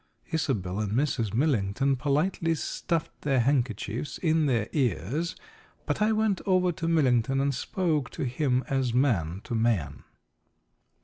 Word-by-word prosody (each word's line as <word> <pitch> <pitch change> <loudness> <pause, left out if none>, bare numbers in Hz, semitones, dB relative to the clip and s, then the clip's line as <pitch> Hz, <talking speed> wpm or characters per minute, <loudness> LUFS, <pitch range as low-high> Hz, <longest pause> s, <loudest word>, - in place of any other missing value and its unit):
Isobel 110 - -1
and 105 -1 -2
Mrs. 125 -5 0
Millington 130 0 +1
politely 155 +5 0
stuffed 165 +1 -3
their 135 -3 +1
handkerchiefs 120 -1 -1
in 160 -3 +2
their 115 -5 +1
ears, 135 - -1 0.5
but - - -2
I 215 +1 +4
went 215 -3 +1
over 185 -1 +3
to 165 0 -4
Millington 135 -5 +2
and 140 0 +1
spoke 155 0 -1
to - - -1
him 130 0 0
as 130 -3 0
man 100 - +1
to - - -6
man. 110 -9 0
135 Hz, 135 wpm, -27 LUFS, 115-160 Hz, 0.5 s, I